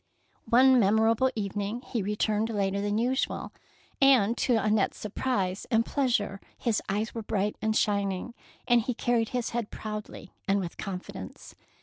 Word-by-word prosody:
One 255 +1 +6
memorable 220 +4 +3
evening 205 +3 -3
he 235 - -3
returned 210 +2 0
later 200 -2 0
than 205 +1 0
usual, 250 +4 -1 0.5
and 245 -5 +5
to 245 - +2
Annette's 215 -1 +1
sur 210 - -6
prise 195 -7 -1
and 230 0 +3
pleasure 225 -8 0 0.2
his 230 -4 0
eyes 210 +3 -1
were 230 - -4
bright 210 -1 -1
and 220 0 0
shining, 200 +1 0 0.3
and 240 -1 +5
he 240 +2 -3
carried 235 -2 +1
his 245 -2 -2
head 235 -3 -2
proudly 210 -3 -7
and 200 +1 +3
with 175 -3 -5
confidence. 190 -3 -7
215 Hz, 150 wpm, -28 LUFS, 200-240 Hz, 0.5 s, One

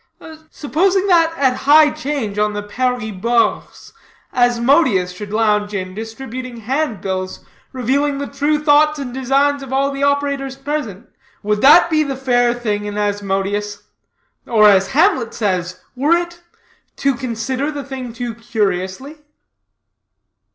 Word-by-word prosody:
"Supposing 370 +9 0
that 330 -2 +4
at 260 -2 +1
high 300 0 +7
'change 250 -8 -4
on 210 0 +1
the 205 0 -4
Paris 245 +1 -2
Bourse, 230 +4 -1 0.4
Asmodeus 245 - +2
should 205 +3 -9
lounge 210 -1 +1
in, 185 -1 -4
distributing 235 +3 -7
hand 245 - -2
bills, 185 -1 -4 0.3
revealing 275 +3 0
the 285 - -3
true 290 +2 0
thoughts 300 +1 +4
and 265 -4 -6
designs 275 +2 +1
of 270 -1 -9
all 275 +1 +1
the 275 0 -6
operators 280 -1 0
present 270 -7 -5 0.4
would 210 0 0
that 335 +5 +6
be 310 -1 +3
the 280 -3 -2
fair 245 -2 +2
thing 210 -4 -3
in 205 0 -5
Asmodeus? 205 0 -2 0.6
Or, 215 -3 +5
as 195 -2 +4
Hamlet 300 - +2
says, 185 -4 -2 0.2
were 290 +6 +3
it 345 0 -6 0.5
'to 275 0 +1
consider 255 +3 -3
the 290 -2 -5
thing 260 -3 -7
too 240 0 -5
curiously?'" 220 - -3
250 Hz, 135 wpm, -18 LUFS, 210-280 Hz, 0.6 s, high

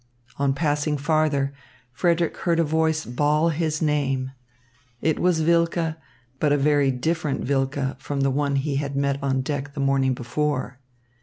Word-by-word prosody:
On 140 -1 +1
passing 150 0 0
farther, 145 -2 +1 0.4
Frederick 170 +5 +1
heard 170 -2 +1
a - - +4
voice 160 0 +1
bawl 150 +6 +2
his 160 -1 -1
name. 135 -3 0 0.7
It 160 +3 0
was 175 -3 +2
Wilke, 170 0 +2 0.5
but 150 - +2
a 145 - +4
very 145 -1 +3
different 150 +2 -1
Wilke 135 0 -1
from 140 +1 -3
the 135 0 +2
one 140 +1 0
he 140 0 0
had 140 -1 -3
met 140 0 0
on 135 -1 0
deck 140 +1 -4
the - - -5
morning 135 -1 +2
before. 130 +1 -2
145 Hz, 155 wpm, -24 LUFS, 135-155 Hz, 0.7 s, a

